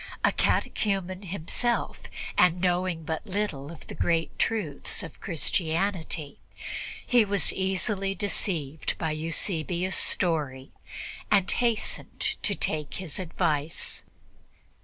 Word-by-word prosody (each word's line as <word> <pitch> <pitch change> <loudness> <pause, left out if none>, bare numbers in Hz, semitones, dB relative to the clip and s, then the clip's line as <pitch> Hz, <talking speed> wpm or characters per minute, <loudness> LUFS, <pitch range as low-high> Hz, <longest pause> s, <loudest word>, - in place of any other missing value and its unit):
A - - +6
catechumen 190 -3 +1
himself, 200 +6 -1 0.4
and 180 -1 +5
knowing 180 -2 +1
but 160 +7 -3
little 185 -8 -2
of 165 - -11
the - - -7
great 165 -1 +1
truths 205 -11 0
of 165 - -9
Christianity, 165 -2 0 0.7
he 245 -2 +6
was 200 -3 +1
easily 195 +1 0
deceived 160 -8 -1
by 160 -2 0
Eusebius' 165 +3 0
story 145 -7 +1 0.6
and 195 -2 +4
hastened 235 -3 +1
to - - +1
take 150 -2 -1
his 185 -4 -3
advice. 160 -4 -1
175 Hz, 105 wpm, -28 LUFS, 160-195 Hz, 0.7 s, A